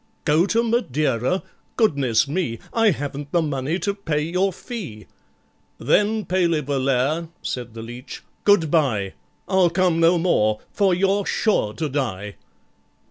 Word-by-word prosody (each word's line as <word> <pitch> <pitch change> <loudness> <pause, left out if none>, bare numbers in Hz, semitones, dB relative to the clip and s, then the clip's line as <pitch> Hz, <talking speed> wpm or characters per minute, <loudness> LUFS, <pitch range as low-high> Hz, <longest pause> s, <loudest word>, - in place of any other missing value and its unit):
"Go 155 +5 +3
to 230 +3 +2
Madeira? 155 - 0 0.3
goodness 140 - +2
me! 145 -6 -2 0.2
I 225 -1 +4
haven't 145 -3 -4
the 170 -2 +2
money 145 +2 -1
to 200 +1 -1
pay 165 -7 -2
your 180 +4 0
fee!" 175 - -8 0.7
"Then, 210 +1 +1
PALEY 170 -4 +1
VOLLAIRE," 135 +3 0 0.2
said 120 -3 -5
the 115 - -7
leech, 120 +3 -9 0.2
"good 185 -7 +4
bye; 110 - +1 0.3
I'll 190 -3 +3
come 175 -1 +1
no 165 +2 +5
more, 110 -12 +2
for 195 -3 +2
you're 195 +2 +1
sure 155 - +1
to 155 - -2
die." 110 -8 -3
160 Hz, 135 wpm, -22 LUFS, 130-190 Hz, 0.7 s, no